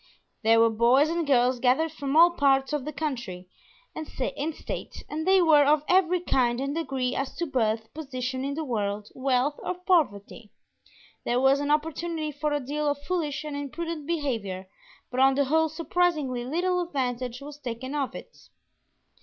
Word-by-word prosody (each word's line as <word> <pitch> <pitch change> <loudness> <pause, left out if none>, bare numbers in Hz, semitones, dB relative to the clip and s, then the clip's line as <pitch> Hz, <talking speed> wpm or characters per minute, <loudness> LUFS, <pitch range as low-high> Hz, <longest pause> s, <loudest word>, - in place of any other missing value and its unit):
There 225 0 +4
were 230 0 +5
boys 245 +7 +4
and 335 -2 -1
girls 250 -2 +3
gathered 265 +6 +2
from 280 -2 -3
all 340 +2 +8
parts 270 -4 +2
of 290 -3 -2
the 305 - -3
county 235 - -4 0.5
and 315 - -6
state, 290 +4 -5
and 315 +3 -4
they 380 -1 +5
were 305 -3 +6
of 295 +1 +3
every 360 -1 +3
kind 245 -7 +1
and 275 +1 -2
degree 265 -5 -2
as 270 -1 -3
to 345 - -2
birth, 225 -6 -1
position 260 -4 -4
in 280 +1 -2
the 320 - -3
world, 210 -5 -2
wealth 265 +2 0
or 365 - -3
poverty. 275 - 0 0.7
There 240 +1 +1
was 270 +1 +4
an 290 0 -2
opportunity 310 +1 -1
for 300 +1 -2
a 290 - +1
deal 295 +3 -3
of 290 - 0
foolish 315 -4 -2
and 300 -1 -5
imprudent 300 +2 -5
behavior, 225 - -2 0.4
but 250 - -2
on 270 0 +5
the 280 0 +2
whole 320 +3 +2
surprisingly 315 -6 0
little 360 +6 0
advantage 255 -6 -3
was 290 +1 -10
taken 260 0 -5
of 280 -3 -2
it. - - -10
280 Hz, 170 wpm, -26 LUFS, 250-315 Hz, 0.7 s, all